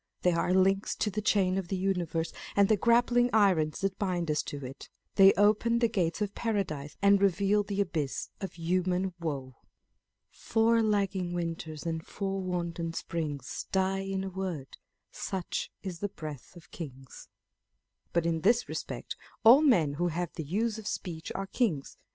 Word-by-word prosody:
They 180 - +4
are 170 +1 +1
links 190 +2 +2
in 210 - -1
the 215 - -1
chain 195 -3 +2
of 185 - -5
the 190 - -2
universe, 175 -4 -1 0.2
and 200 -1 +5
the 215 - +5
grappling 240 +3 +3
irons 185 -8 +3
that 195 -1 -1
bind 175 -5 0
us 150 - +1
to 145 -2 -6
it. 130 +2 -9 0.2
They 195 0 +8
open 215 +3 +3
the 235 0 +3
gates 195 -3 0
of 205 -1 -4
Paradise, 170 -11 -2
and 200 0 +5
reveal 200 +2 +3
the 200 0 -1
abyss 160 -8 -2
of 195 - -5
human 180 +2 0
woe. 135 -7 -4 0.7
Four 225 +1 +2
lagging 195 -4 0
winters 165 -3 -4
and 165 -1 -2
four 195 0 -3
wanton 170 -2 -3
springs 155 -5 -4
Die 190 0 +1
iu 195 0 -3
a - - -3
word; 180 -8 -5 0.4
such 185 -3 -3
is 180 -3 -5
the 205 - -2
breath 155 -4 -8
of 175 0 -15
kings. 135 -5 -9 0.8
But 170 -1 +1
in 165 -1 0
this 230 +6 +3
respect - - -5 0.3
all 240 +6 +9
men 180 - +4
who 175 - +3
have 175 0 -3
the 160 - -5
use 215 +8 -1
of 215 - -8
speech 165 -4 -4
are 195 - -2
kings. 195 - -1
185 Hz, 170 wpm, -30 LUFS, 165-200 Hz, 0.8 s, all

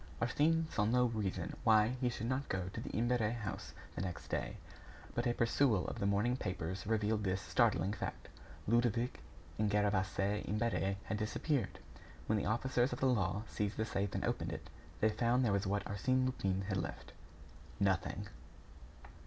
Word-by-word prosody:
Arsène 160 +7 +2
saw 105 - +1
no 125 +4 +4
reason 100 -7 -2
why 110 -1 +6
he 125 - +3
should 115 -2 -4
not 130 +3 -1
go 95 -1 -1
to 115 - -6
the - - -5
Imbert 120 +2 +1
house 110 -2 -3 0.2
the - - -4
next 90 -2 -5
day. - - -2 0.6
But 120 +1 0
a 120 - +2
perusal 115 -3 +2
of - - -4
the 100 - +1
morning 105 +5 +2
papers 95 -3 -3
revealed 110 -1 +1
this 95 -1 0
startling 95 +1 +2
fact: - - -5 0.4
Ludovic 120 +1 +2 0.4
and 105 -1 +2
Gervaise 100 0 +1
Imbert 105 -3 0
had 110 - -2
disappeared. 110 +4 -1 0.5
When 110 0 +2
the - - -2
officers 120 +3 +1
of - - -3
the - - +1
law 105 -5 +2
seized 105 -1 -2
the 110 - +1
safe 100 -2 -2
and - - -1
opened - - -1
it, - - -7 0.3
they 110 - +5
found 120 +4 +2
there 105 - +2
what 100 0 0
Arsène 130 +6 +1
Lupin 95 -7 0
had 95 0 -1
left 70 -8 -5 0.7
nothing. 95 +1 +1
105 Hz, 170 wpm, -35 LUFS, 100-120 Hz, 0.7 s, why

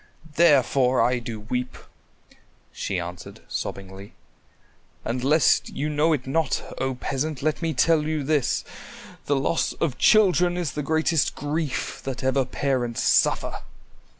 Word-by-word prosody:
Therefore 135 -5 +4
I 125 0 +2
do 115 -2 -6
weep," 125 +4 -4 1.0
she 95 - -3
answered 90 0 -8
sobbingly, 95 +1 -6 0.9
"and 125 +1 -2
lest 150 +3 +3
you 150 +2 -3
know 150 +2 +2
it 145 -5 -1
not, 150 +2 0 0.2
O 130 0 -1
Peasant, 140 +3 -3
let 155 +2 0
me 165 -2 -1
tell 165 -2 +3
you 155 -1 -2
this; 145 -2 0 0.6
the 145 - +2
loss 135 +4 0
of 145 -7 -2
children 180 -4 +4
is 170 -6 -2
the 150 - -4
greatest 160 +1 +1
grief 150 -1 -3
that 130 -2 -5
ever 130 0 +1
parents 125 -2 -1
suffer." - - +2
140 Hz, 135 wpm, -24 LUFS, 125-155 Hz, 1.0 s, Therefore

